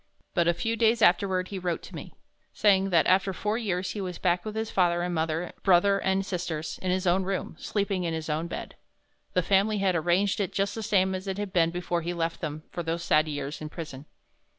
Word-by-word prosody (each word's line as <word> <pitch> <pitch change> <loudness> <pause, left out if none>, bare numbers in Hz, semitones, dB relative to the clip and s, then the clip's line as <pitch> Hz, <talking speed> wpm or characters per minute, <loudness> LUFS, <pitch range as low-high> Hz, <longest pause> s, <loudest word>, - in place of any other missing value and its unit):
But 170 -2 +2
a 170 - +4
few 225 +5 -1
days 225 0 +3
afterward 185 0 +3
he 195 - -4
wrote 175 -2 -2
to - - -11
me, - - -9 0.4
saying 195 -2 +3
that 170 -3 +4
after 190 +1 +3
four 210 +4 -1
years 185 -5 -2
he 210 - -4
was 180 -2 -4
back 175 0 +1
with 215 0 -6
his 220 0 -2
father 175 -2 +2
and 180 0 -2
mother, 160 +1 -1
brother 195 +1 +4
and 190 0 0
sisters, 170 -4 -4
in 185 - -2
his 185 +1 0
own 180 +2 +3
room, 190 -2 -3
sleeping 200 -3 -1
in 170 - -1
his 160 -1 -4
own 160 +2 -1
bed. - - -6 0.6
The 180 - +2
family 200 +4 +3
had 195 -2 +1
arranged 175 +5 +2
it 200 - -1
just 200 0 0
the 225 - -5
same 190 -3 +2
as 185 +1 -5
it 190 0 -2
had 205 -2 -4
been 165 -3 +4
before 175 0 -2
he 175 +2 -3
left 165 0 -2
them 155 -1 -4
for 175 - -3
those 165 +1 -2
sad 155 +1 +3
years 145 -1 -4
in 155 - -5
prison. 150 -4 -8
180 Hz, 230 wpm, -27 LUFS, 170-195 Hz, 0.6 s, a